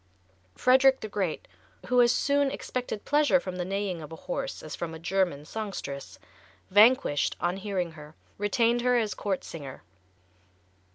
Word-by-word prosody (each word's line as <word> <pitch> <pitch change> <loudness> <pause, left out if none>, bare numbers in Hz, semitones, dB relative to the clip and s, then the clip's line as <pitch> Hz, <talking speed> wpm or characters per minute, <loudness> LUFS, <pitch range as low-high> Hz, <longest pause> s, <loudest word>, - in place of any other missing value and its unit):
Frederick 265 +1 +5
the 215 - -4
Great, 195 -5 -3 0.4
who 250 0 +4
as 240 -1 +5
soon 280 +1 +2
expected 250 -5 -5
pleasure 290 -1 +4
from 185 -7 -6
the 180 - -1
neighing 195 -2 -3
of 150 - -9
a - - -6
horse - - -5
as - - -6
from 165 -1 -5
a - - -6
German 175 -3 -1
songstress, 195 -9 -6 0.5
vanquished 210 - +4
on 175 +2 -1
hearing 190 -4 -2
her, 150 0 -13 0.2
retained 230 +3 +2
her 250 0 +3
as 220 -3 0
court 195 -3 -2
singer. 140 -5 -9
205 Hz, 155 wpm, -28 LUFS, 175-250 Hz, 0.5 s, Frederick